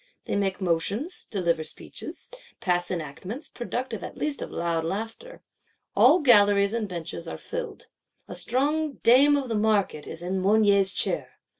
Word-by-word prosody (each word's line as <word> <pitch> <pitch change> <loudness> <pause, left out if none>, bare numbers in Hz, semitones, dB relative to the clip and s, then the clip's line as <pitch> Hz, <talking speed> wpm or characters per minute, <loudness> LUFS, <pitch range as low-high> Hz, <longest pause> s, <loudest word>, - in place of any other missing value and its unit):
They - - -2
make 195 -1 -1
motions; 200 - -1
deliver 170 -6 0
speeches; 310 - -8 0.3
pass 175 -1 0
enactments; 185 - -6
productive 240 -1 -5
at - - -8
least 300 -2 -2
of - - -5
loud 170 -1 -1
laughter. 225 - -6 0.5
All 360 - +6
galleries 205 -5 +5
and 230 -2 -1
benches 170 -2 -5
are - - -5
filled; 480 0 -6 0.4
a - - -7
strong 295 +4 0
Dame 275 +5 +6
of 275 -2 -3
the 230 - -3
Market 210 -8 +1
is 165 - -6
in 185 +1 -2
Mounier's 200 -1 +4
Chair. - - +1
205 Hz, 150 wpm, -26 LUFS, 180-255 Hz, 0.5 s, All